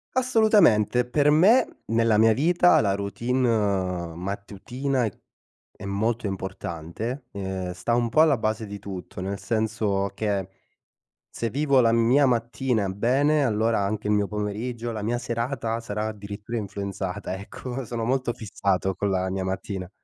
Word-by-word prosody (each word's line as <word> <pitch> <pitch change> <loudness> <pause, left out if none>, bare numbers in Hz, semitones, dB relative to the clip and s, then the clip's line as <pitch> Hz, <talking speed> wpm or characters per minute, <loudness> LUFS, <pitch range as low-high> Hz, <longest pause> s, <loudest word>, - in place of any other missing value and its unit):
Assolutamente, 215 - +4
per 145 +4 +2
me, 190 +12 +4
nella 115 -1 +2
mia 110 0 +5
vita, 175 +6 +4
la 100 -2 +1
routine 100 -6 0
mattutina 105 +8 -3
è 105 - -6 0.6
è - - -10
molto 110 +4 -1
importante. 95 - -5
Ehm, 95 -2 -4
sta 115 - -1
un 120 -1 +1
po' 130 +7 +3
alla 155 -5 +5
base 110 0 -1
di 100 0 -7
tutto, 95 -2 -8
nel 100 +2 -3
senso 110 -3 -1
che 100 -3 -1 0.8
se 115 - -3
vivo 140 -1 +3
la 115 -1 +4
mia 120 +5 +4
mattina 120 -2 0
bene, 135 +9 +2
allora 110 -1 +1
anche 105 +1 -2
il 105 - +3
mio 105 -1 +2
pomeriggio, 110 +3 -3
la 110 - -4
mia 115 +3 -1
serata 115 -1 -2
sarà 105 -1 -3
addirittura 105 +2 -6
influenzata, 100 -2 -4
ecco; 125 +6 -6
sono 115 -1 -4
molto 130 -1 0
fissato 95 -3 -1
con 100 +2 -1
la 95 -1 0
mia 95 0 -2
mattina. 95 0 -4
110 Hz, 145 wpm, -25 LUFS, 100-125 Hz, 0.8 s, mia